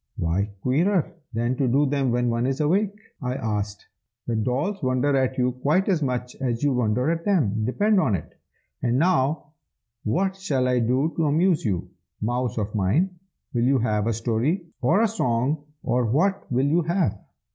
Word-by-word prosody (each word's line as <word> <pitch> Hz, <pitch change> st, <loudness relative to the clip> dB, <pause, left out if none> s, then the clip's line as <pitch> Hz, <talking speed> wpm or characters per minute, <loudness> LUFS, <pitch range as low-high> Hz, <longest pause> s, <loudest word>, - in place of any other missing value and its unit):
"Why 90 Hz, +5 st, 0 dB
queerer 170 Hz, +7 st, +1 dB, 0.2 s
than 120 Hz, +2 st, -1 dB
to 135 Hz, -, +1 dB
do 140 Hz, +5 st, +3 dB
them 140 Hz, -2 st, 0 dB
when 120 Hz, 0 st, +1 dB
one 115 Hz, +2 st, 0 dB
is 135 Hz, +2 st, -1 dB
awake?" 195 Hz, +7 st, +1 dB, 0.2 s
I 125 Hz, -1 st, -2 dB
asked. 105 Hz, -4 st, -3 dB, 0.4 s
"The 120 Hz, -, -1 dB
dolls 135 Hz, -, -1 dB
wonder 130 Hz, +1 st, +1 dB
at 130 Hz, -1 st, +1 dB
you 125 Hz, 0 st, +2 dB
quite 145 Hz, +9 st, +1 dB
as 175 Hz, -5 st, +2 dB
much 125 Hz, -2 st, -2 dB
as 120 Hz, -2 st, -1 dB
you 145 Hz, -2 st, +3 dB
wonder 125 Hz, +4 st, +1 dB
at 165 Hz, 0 st, -2 dB
them, 115 Hz, -, +1 dB
depend 205 Hz, -, +2 dB
upon 110 Hz, -, +2 dB
it! 80 Hz, -, -7 dB, 0.5 s
And 120 Hz, 0 st, +1 dB
now, 150 Hz, -2 st, +1 dB, 0.5 s
what 190 Hz, -, 0 dB
shall 140 Hz, -10 st, 0 dB
I 125 Hz, -1 st, +2 dB
do 130 Hz, +7 st, +1 dB
to 160 Hz, -2 st, +2 dB
amuse 165 Hz, +3 st, +2 dB
you, 95 Hz, -6 st, -1 dB, 0.3 s
mouse 120 Hz, +2 st, -1 dB
of 105 Hz, -1 st, -2 dB
mine? 110 Hz, -, +1 dB, 0.4 s
will 120 Hz, -1 st, +1 dB
you 135 Hz, +1 st, +4 dB
have 110 Hz, -3 st, 0 dB
a 115 Hz, -, +1 dB
story, 120 Hz, -, 0 dB, 0.2 s
or 160 Hz, -, +3 dB
a -, -, +4 dB
song, 145 Hz, -, 0 dB, 0.2 s
or 120 Hz, 0 st, +1 dB
what 175 Hz, -, 0 dB
will 130 Hz, +2 st, +2 dB
you 160 Hz, +5 st, +3 dB
have?" 170 Hz, -, 0 dB
130 Hz, 180 wpm, -24 LUFS, 120-160 Hz, 0.5 s, you